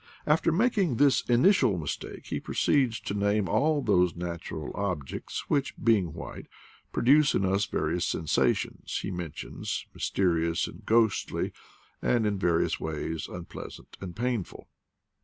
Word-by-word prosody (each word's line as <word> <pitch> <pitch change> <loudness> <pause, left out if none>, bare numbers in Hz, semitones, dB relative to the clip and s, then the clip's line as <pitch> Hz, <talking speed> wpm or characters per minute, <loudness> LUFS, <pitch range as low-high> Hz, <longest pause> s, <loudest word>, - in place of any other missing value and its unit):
After 155 +2 +3
making 195 - +2
this 140 +2 +4
initial 120 - +4
mistake, 75 -4 -5
he - - -3
proceeds 125 -6 +1
to 100 - -4
name 100 0 +1
all 145 - +2
those 90 -5 +3
natural 85 -3 -5
objects 90 -8 -4
which, 140 -2 0
being 100 -9 +2
white, 85 - -8 0.4
produce 145 +3 +4
in 95 - +2
us 95 +1 +1
the - - -3
various 85 +3 0
sensations 80 -2 0
he - - -3
mentions, 85 -4 -5
mysterious 85 -3 +1
and - - -10
ghostly, 115 -2 +2 0.5
and 120 -3 +2
in 100 -2 0
various 85 -3 +1
ways 80 +1 -3
unpleasant 90 -1 -9
and 90 -3 -6
painful. 120 -5 -3
100 Hz, 135 wpm, -28 LUFS, 85-125 Hz, 0.5 s, this